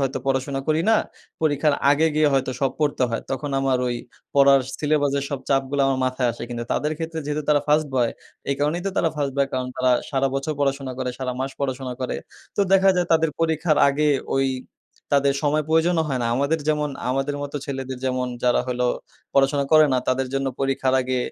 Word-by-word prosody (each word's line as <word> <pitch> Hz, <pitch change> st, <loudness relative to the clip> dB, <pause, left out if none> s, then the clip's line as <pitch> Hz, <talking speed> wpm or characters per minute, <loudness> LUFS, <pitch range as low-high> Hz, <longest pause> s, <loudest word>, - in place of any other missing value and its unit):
হয়তো 135 Hz, 0 st, -1 dB
পড়াশোনা 135 Hz, 0 st, 0 dB
করি 155 Hz, +1 st, +3 dB
না। 225 Hz, -, +6 dB, 0.5 s
পরীক্ষার 150 Hz, -1 st, +2 dB, 0.2 s
আগে 150 Hz, +3 st, +4 dB
গিয়ে 155 Hz, -1 st, +4 dB
হয়তো 135 Hz, -1 st, +1 dB
সব 135 Hz, -1 st, +2 dB
পড়তে 145 Hz, -3 st, +1 dB
হয়। 115 Hz, -, -1 dB
তখন 135 Hz, +2 st, -3 dB
আমার 135 Hz, -2 st, +1 dB
ওই 120 Hz, -, -1 dB, 0.4 s
পড়ার 140 Hz, -1 st, +6 dB, 0.2 s
সিলেবাসের 145 Hz, -2 st, +1 dB
সব 140 Hz, -2 st, -3 dB
চাপগুলো 135 Hz, 0 st, +1 dB
আমার 135 Hz, -1 st, +1 dB
মাথায় 130 Hz, -1 st, 0 dB
আসে। 115 Hz, -, -10 dB
কিন্তু 120 Hz, -1 st, -4 dB
তাদের 150 Hz, +3 st, 0 dB
ক্ষেত্রে 165 Hz, 0 st, -4 dB
যেহেতু 150 Hz, +1 st, -2 dB
তারা 150 Hz, -1 st, +4 dB
ফার্স্ট 150 Hz, +1 st, +3 dB
বয়, 120 Hz, -3 st, +2 dB, 0.4 s
এই -, -, +2 dB
কারণেই 150 Hz, +5 st, 0 dB
তো -, -, 0 dB
তারা 165 Hz, -, +3 dB
ফার্স্ট 140 Hz, -2 st, -1 dB
বয়। 140 Hz, 0 st, +3 dB
কারণ 130 Hz, -1 st, -1 dB
তারা 130 Hz, 0 st, +2 dB, 0.2 s
সারা 135 Hz, -1 st, +1 dB
বছর 135 Hz, +3 st, -1 dB
পড়াশোনা 135 Hz, -2 st, -1 dB
করে, 130 Hz, -1 st, -2 dB
সারা 130 Hz, -1 st, -2 dB
মাস 135 Hz, +1 st, -2 dB
পড়াশোনা 130 Hz, -2 st, -2 dB
করে। 130 Hz, -, -2 dB, 0.4 s
তো -, -, +2 dB
দেখা 195 Hz, 0 st, +5 dB
যায় 180 Hz, -1 st, +1 dB
তাদের 160 Hz, -1 st, +3 dB
পরীক্ষার 160 Hz, -1 st, +1 dB
আগে 150 Hz, +2 st, +1 dB, 0.3 s
ওই 135 Hz, 0 st, +2 dB, 0.7 s
তাদের 140 Hz, -1 st, +3 dB
সময় 150 Hz, +1 st, +2 dB
প্রয়োজনও 160 Hz, +1 st, +3 dB
হয় 135 Hz, -3 st, -1 dB
না। -, -, 0 dB
আমাদের 140 Hz, +4 st, +1 dB
যেমন 150 Hz, -1 st, +1 dB, 0.2 s
আমাদের 135 Hz, +2 st, -1 dB
মতো 145 Hz, +1 st, -5 dB
ছেলেদের 135 Hz, -2 st, -5 dB
যেমন 130 Hz, -1 st, 0 dB, 0.2 s
যারা 125 Hz, -1 st, +3 dB
হলো 125 Hz, 0 st, 0 dB, 0.5 s
পড়াশোনা 140 Hz, +1 st, +3 dB
করে 155 Hz, -1 st, +7 dB
না, 130 Hz, -, +3 dB
তাদের 130 Hz, +1 st, +1 dB
জন্য 135 Hz, 0 st, 0 dB
পরীক্ষার 135 Hz, -1 st, +1 dB
আগে 130 Hz, 0 st, -1 dB
140 Hz, 200 wpm, -23 LUFS, 130-150 Hz, 0.7 s, করে